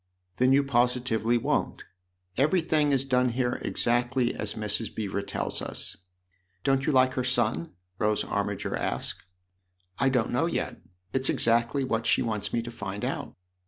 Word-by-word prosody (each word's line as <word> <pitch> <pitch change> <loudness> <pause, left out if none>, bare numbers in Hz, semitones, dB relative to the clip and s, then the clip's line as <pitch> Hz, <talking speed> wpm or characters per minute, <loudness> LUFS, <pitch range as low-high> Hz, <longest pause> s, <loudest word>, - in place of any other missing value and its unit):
" 90 0 -45
Then 130 +1 +4
you 140 +1 +5
positively 120 -3 +1
won't. 115 - -1 0.5
Everything 155 - +2
is 135 -1 +1
done 125 -1 +2
here 120 0 -1
exactly 120 +1 +1
as 105 0 -3
Mrs. 105 0 +1
Beever 100 -2 -2
tells 100 - -2
us. - - -4 0.7
Don't 135 +2 +1
you - - +4
like 130 -1 +4
her 130 - -1
son? 110 -11 0
" 90 +1 -42
Rose 105 -1 +1
Armiger - - -2
asked. - - -3 0.4
" 90 0 -29
I 135 - +3
don't 125 -4 +1
know 135 +7 +1
yet; - - -3 0.3
it's 130 0 +1
exactly 120 +4 +2
what 115 -3 -1
she - - +3
wants 110 -3 -2
me 115 - 0
to 120 - -7
find 100 -3 -5
out." - - -4
120 Hz, 165 wpm, -27 LUFS, 110-130 Hz, 0.7 s, you